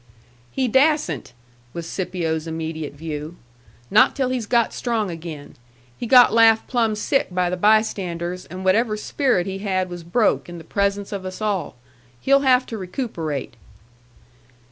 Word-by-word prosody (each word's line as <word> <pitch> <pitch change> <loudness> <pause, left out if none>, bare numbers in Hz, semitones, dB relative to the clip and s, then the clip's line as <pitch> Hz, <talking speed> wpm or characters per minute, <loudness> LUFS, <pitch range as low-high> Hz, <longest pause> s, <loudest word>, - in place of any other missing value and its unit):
"He 260 - -1
dassent," 265 - +1 0.4
was 170 -1 -6
Scipio's 170 -4 -3
immediate 160 -2 -5
view. 155 +2 -6 0.6
"Not 215 - +5
till 265 -2 0
he's 250 -4 -2
got 235 -1 +2
strong 225 -6 -1
again. 160 -3 -9 0.4
He 240 - -5
got 245 -1 +7
laughed 225 -1 +5
plumb 230 -3 0
sick 270 +6 0
by 180 0 0
the - - 0
bystanders, 180 -4 0
and 185 +1 -8
whatever 215 +3 +2
spirit 225 -4 0
he 195 0 -5
had 185 -2 -1
was 175 0 -6
broke 170 - +1
in 175 - -8
the 165 - -10
presence 200 +3 -1
of 200 -2 -4
us 185 0 -7
all. 210 -4 -2 0.4
He'll 275 +1 +4
have 255 -2 +3
to 225 - -6
recuperate." 175 - -4
195 Hz, 150 wpm, -22 LUFS, 170-230 Hz, 0.6 s, got